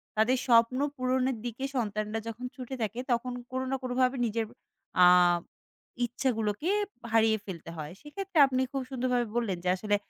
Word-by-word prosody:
তাদের 230 +4 +3
স্বপ্ন 235 +2 +5 0.2
পূরণের 255 -1 +1
দিকে 240 +3 -5
সন্তানরা 215 -1 -1
যখন 235 +2 -5
ছুটে 260 +1 -6
থাকে, 220 +3 -2
তখন 240 +1 0 0.2
কোনো 260 0 -2
না - - +2
কোনোভাবে 255 +1 +1
নিজের 225 0 -1 0.6
আ - - +10 1.0
ইচ্ছাগুলোকে 230 - -1 0.4
হারিয়ে 220 -1 +4
ফেলতে 170 -4 -7
হয়। 155 +1 -5
সেক্ষেত্রে 370 +4 -6
আপনি 260 0 0
খুব 270 -1 -2
সুন্দরভাবে 250 -2 0
বললেন 215 -7 0
যে 180 - +1
আসলে, 205 +2 0
240 Hz, 150 wpm, -29 LUFS, 220-255 Hz, 1.0 s, আ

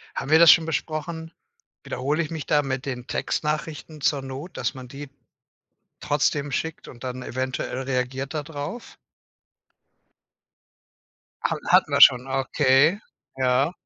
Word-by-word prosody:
Haben 135 - -4
wir 160 - +7
das 170 -1 +9
schon 160 - +6
besprochen? 160 +1 -4 0.5
Wiederhole 145 +6 -1
ich 155 - -6
mich 160 -4 -5
da 150 -1 +3
mit 130 0 -4
den 125 -2 -5
Textnachrichten 155 0 -3
zur 140 -1 +1
Not, 135 +6 -8
dass - - -1
man 130 -1 -10
die 140 +2 -9 0.9
trotzdem 145 0 0
schickt 160 +3 -3
und 120 - -13
dann 130 0 -5
eventuell 130 0 -3
reagiert 130 +2 -3
da 155 - -2
drauf? 150 +10 -7 2.5
Hat - - 0
hatten - - +4
wir - - +2
schon, 125 -1 +8
okay, 135 +6 +3 0.4
ja. 130 +4 +2
140 Hz, 135 wpm, -24 LUFS, 130-155 Hz, 2.5 s, das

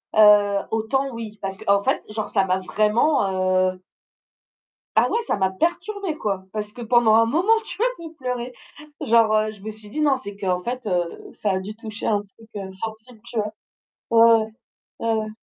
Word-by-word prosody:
Heu, 205 -2 +6
autant, 245 +5 0
oui, 220 -2 -7
parce 195 -1 -4
qu'en 200 +1 +2
fait - - 0
genre, 215 0 -4
ça 195 -2 +2
m'a 185 0 +1
vraiment, 190 -3 +2
heu 185 - -14 1.2
Ah - - +4
ouais, 465 - +1
ça - - 0
m'a 190 -1 +2
perturbé, 350 - -2
quoi, 195 -8 -2
parce 210 -1 -4
que 245 - -10
pendant 230 -1 +4
un 230 0 +6
moment, 335 - +1
tu - - -8
vois, 470 - +3
j'ai 330 -1 -9
pleuré, 250 -4 -4 0.5
genre, 225 -1 +4
heu, 215 0 +2
je 210 -2 -15
me 220 +2 -5
suis 215 -1 -12
dit: 305 +9 -3
«Non, 285 -3 +3
c'est 205 -6 -9
qu'en 185 -3 -1
fait, 245 +5 -4
heu, 175 -4 -2
a - - +4
a 190 -1 +1
dû 205 +3 -7
toucher 220 -1 -7
un 205 -2 +2
truc, 205 +2 -19
heu, 195 -2 -5
sensible», 220 +4 -7
tu 235 - -7
vois? 210 0 -1 0.6
Ouais, 230 0 +7
ouais. - - -16 0.5
Ouais, 230 0 0
ouais. 220 -1 -1
215 Hz, 200 wpm, -23 LUFS, 200-240 Hz, 1.2 s, Ouais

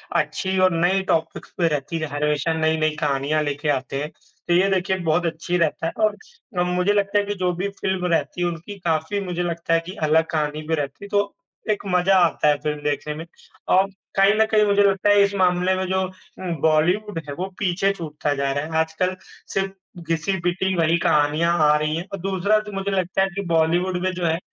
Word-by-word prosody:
अच्छी 155 +6 0
और 185 - +3
नई 185 +3 +3
टॉपिक्स 160 0 -1
पे 170 -2 +3
रहती 150 +2 -2
हैं 155 - -2
हर 145 +1 -1
विषय 150 +2 0
में 160 - -3
नई-नई 155 -1 +1
कहानियाँ 145 +1 0
लेके 145 +1 -2
आते 135 0 -1
हैं। 150 - -4 0.4
तो 175 - +2
ये 190 +3 +4
देखिए 190 0 +1
बहुत 175 +3 +2
अच्छी 170 +2 -1
रहता 165 0 0
है - - -2
और 215 - -4
मुझे 180 +3 +1
लगता 205 0 +2
है 205 - -1
कि 205 - -2
जो 180 -1 0
भी 195 +3 -2
फ़िल्म 190 -2 -2
रहती 175 +2 -1
है, 175 - +2
उनकी 175 +4 -6
काफ़ी 165 +3 -1
मुझे 175 -1 -2
लगता 170 -1 -2
है 165 - +4
कि 185 +3 -7
अलग 160 +1 +3
कहानी 150 -1 -1
भी 160 - +1
रहती 145 +4 -5
है - - -8
तो, 205 0 0 0.3
एक 210 - 0
मज़ा 180 +1 +3
आता 160 -2 0
है 145 -1 +4
फ़िल्म 150 -1 -3
देखने 145 +1 -2
में 160 +2 -7 0.5
और 190 +1 +5 0.3
कहीं 195 +1 +5
न - - +6
कहीं 215 -1 +4
मुझे 205 0 +3
लगता 195 +1 +2
है 205 0 +6
इस 200 0 0
मामले 180 0 +2
में 185 0 -2
जो 190 0 +1 0.6
बॉलीवुड 170 +5 +2
है, 145 - -4
वो 180 +5 -3
पीछे 195 0 +1
छूटता 150 -4 -3
जा 140 -1 -1
रहा 145 - -1
है, 160 0 -3
आजकल 160 +3 0 0.4
सिर्फ़ 195 0 0 0.4
घिसी-पिटी 180 +2 0
वही 165 0 +3
कहानियाँ 155 +4 +2
आ 150 - +5
रही 155 +1 -1
हैं 170 +2 -4
और 195 - -4
दूसरा 195 +3 +1
तो 210 -1 -8
मुझे 195 0 -3
लगता 185 0 0
है 195 - +3
कि 200 - -2
बॉलीवुड 175 +3 +2
में 185 - +1
जो 180 -1 -3
है, 165 0 +2
175 Hz, 220 wpm, -22 LUFS, 155-195 Hz, 0.6 s, न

